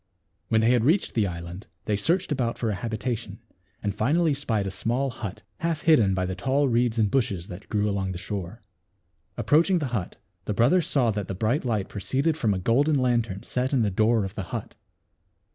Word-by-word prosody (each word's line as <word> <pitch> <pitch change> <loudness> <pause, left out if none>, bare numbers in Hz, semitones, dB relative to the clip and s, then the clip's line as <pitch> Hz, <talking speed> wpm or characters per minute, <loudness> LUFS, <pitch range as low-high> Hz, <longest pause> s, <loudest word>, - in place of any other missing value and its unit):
When 110 - +3
they 115 +2 +4
had 120 -3 +3
reached 165 - +2
the 110 -3 +2
island 85 +2 -7 0.2
they 105 - +1
searched 170 - 0
about 125 -5 0
for 115 -3 -1
a - - -1
habitation 110 +1 -4 0.5
and 100 -1 -1
finally 150 +10 +2
spied 115 -8 -1
a 95 - -3
small 120 +7 -1
hut, 110 -5 -7
half 165 -2 -1
hidden 115 - +4
by 95 -1 0
the 95 - -3
tall 135 +9 +1
reeds 120 -1 +1
and 105 -3 +2
bushes 100 -10 0
that 90 +3 -9
grew 105 0 +1
along 100 -2 -1
the - - -5
shore. 100 +3 -6 0.7
Approaching 170 +5 +3
the 145 -6 -2
hut 100 -5 -3 0.3
the 105 - -2
brothers 140 - +3
saw 125 -5 +2
that 105 -3 -3
the 95 - -4
bright 115 - 0
light 110 -5 0
proceeded 135 - 0
from 115 -9 +1
a - - -1
golden 140 - +2
lantern 120 -6 0
set 130 +2 -2
in 125 -4 +3
the 105 - +1
door 110 +2 +2
of 95 - -6
the - - -5
hut. - - -5
115 Hz, 205 wpm, -26 LUFS, 100-135 Hz, 0.7 s, they